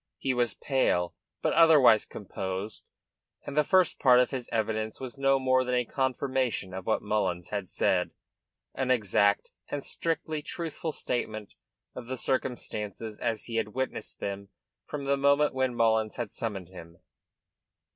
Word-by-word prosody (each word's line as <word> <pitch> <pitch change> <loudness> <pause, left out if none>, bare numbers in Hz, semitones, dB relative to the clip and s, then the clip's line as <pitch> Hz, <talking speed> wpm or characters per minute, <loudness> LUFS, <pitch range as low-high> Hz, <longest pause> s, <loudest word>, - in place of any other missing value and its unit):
He 135 - 0
was 120 -4 0
pale, 90 -11 +1 0.3
but - - +2
otherwise 150 -9 +6
composed, 95 0 -5 0.6
and 140 - -6
the 150 - +4
first 185 +1 +3
part 125 -2 +6
of 125 - +2
his 130 -3 -4
evidence 110 -1 -1
was 130 -2 -6
no 135 0 +3
more 130 -1 +3
than 125 0 -1
a 125 -1 +1
confirmation 130 -6 -1
of 95 -1 -6
what 110 - +1
Mullins 100 -5 -1
had 100 -3 -3
said, - - +1 0.6
an 130 -1 -2
exact 100 -4 +2 0.2
and 145 -1 -4
strictly 160 -2 -2
truthful 165 +1 -4
statement 110 -7 -3 0.4
of 120 -2 -8
the 130 +1 -4
circumstances 110 -5 -3
as 110 -2 -1
he 115 -1 -3
had 110 -1 -2
witnessed 130 0 -3
them 100 0 -5 0.4
from 145 -2 -5
the 140 0 +2
moment 140 +2 +3
when 130 -2 0
Mullins 110 -2 +2
had 120 -4 -4
summoned 100 -6 -4
him. 85 -2 -12
120 Hz, 155 wpm, -29 LUFS, 105-135 Hz, 0.6 s, otherwise